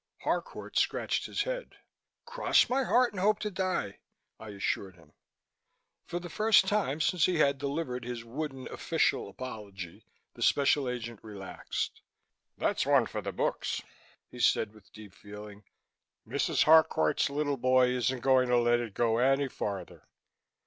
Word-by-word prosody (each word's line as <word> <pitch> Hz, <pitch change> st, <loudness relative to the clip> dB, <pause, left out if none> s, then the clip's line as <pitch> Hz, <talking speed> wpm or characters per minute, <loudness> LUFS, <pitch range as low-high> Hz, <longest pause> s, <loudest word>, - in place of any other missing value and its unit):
Harcourt -, -, -2 dB
scratched -, -, 0 dB
his -, -, -1 dB
head. -, -, -5 dB, 0.5 s
"Cross 475 Hz, -, +2 dB
my 265 Hz, +2 st, +2 dB
heart 250 Hz, -2 st, +3 dB
and 190 Hz, -, -5 dB
hope 210 Hz, +3 st, +3 dB
to 210 Hz, -1 st, -4 dB
die," 185 Hz, -, -2 dB, 0.4 s
I 110 Hz, -, -9 dB
assured 100 Hz, -1 st, -3 dB
him. 80 Hz, -4 st, -21 dB, 0.9 s
For 175 Hz, -, -3 dB
the 175 Hz, -, -8 dB
first 215 Hz, +3 st, +4 dB
time 190 Hz, -8 st, 0 dB
since 155 Hz, +2 st, +2 dB
he 180 Hz, -2 st, 0 dB
had 140 Hz, -3 st, +3 dB
delivered 140 Hz, -3 st, -3 dB
his 120 Hz, -1 st, -6 dB
wooden 135 Hz, +1 st, -5 dB
official -, -, 0 dB
apology, 100 Hz, -6 st, -8 dB, 0.3 s
the -, -, -13 dB
Special 140 Hz, -1 st, +3 dB
Agent 120 Hz, -3 st, -5 dB
relaxed. 100 Hz, -4 st, -5 dB, 0.6 s
"That's -, -, 0 dB
one -, -, +4 dB
for -, -, -5 dB
the -, -, -4 dB
book," -, -, -1 dB, 0.7 s
he 125 Hz, -, -10 dB
said 110 Hz, -3 st, +2 dB
with 105 Hz, -2 st, -20 dB
deep 105 Hz, -3 st, -13 dB
feeling. 105 Hz, 0 st, -11 dB, 0.6 s
"Mrs. -, -, +1 dB
Harcourt's 155 Hz, -, +4 dB
little 145 Hz, 0 st, -1 dB
boy 130 Hz, 0 st, +4 dB
isn't 125 Hz, 0 st, 0 dB
going 130 Hz, -1 st, +3 dB
to 125 Hz, -, +4 dB
let 120 Hz, 0 st, +3 dB
it 115 Hz, -4 st, -5 dB
go 115 Hz, -1 st, +2 dB
any 135 Hz, +2 st, +3 dB
farther. 100 Hz, -7 st, -6 dB
130 Hz, 150 wpm, -30 LUFS, 110-160 Hz, 0.9 s, first